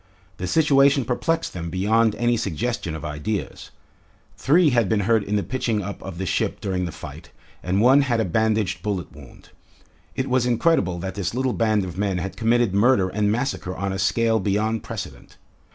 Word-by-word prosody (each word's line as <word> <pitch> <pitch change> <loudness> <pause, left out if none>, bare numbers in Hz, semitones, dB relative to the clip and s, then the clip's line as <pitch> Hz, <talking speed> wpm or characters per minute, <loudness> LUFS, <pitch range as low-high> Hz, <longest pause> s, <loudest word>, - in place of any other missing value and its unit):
The 90 - -4
situation 140 - +4
perplexed 165 +7 -1
them 85 -2 -5
beyond 105 +5 +2
any 120 0 +1
suggestion 110 -3 -3
of 80 - -7
ideas. 75 +7 -4 0.7
Three 160 +2 +3
had 120 -5 +2
been 110 -2 +2
hurt 110 +1 +2
in 105 +1 -2
the 100 - +1
pitching 115 0 -2
up 100 +2 -7
of 95 -3 -8
the 95 - -3
ship - - -1
during 90 -2 -2
the 85 - -4
fight, - - -10 0.3
and 95 +3 0
one 130 +4 +6
had 120 -5 0
a 110 - +1
bandaged 105 -2 0
bullet 95 -3 -3
wound. - - -15 0.7
It 130 - -2
was 125 -1 +1
incredible 120 - +2
that 95 +2 -5
this 100 +1 -3
little 130 -1 0
band 110 -3 +1
of 90 0 -7
men 100 -3 0
had 95 +2 -4
committed 115 -2 +1
murder 100 -2 +3
and 105 +2 0
massacre 120 -6 -2
on 95 0 -3
a 95 - -4
scale 115 +3 +2
beyond 105 +3 0
precedent. - - -8
105 Hz, 185 wpm, -23 LUFS, 95-120 Hz, 0.7 s, one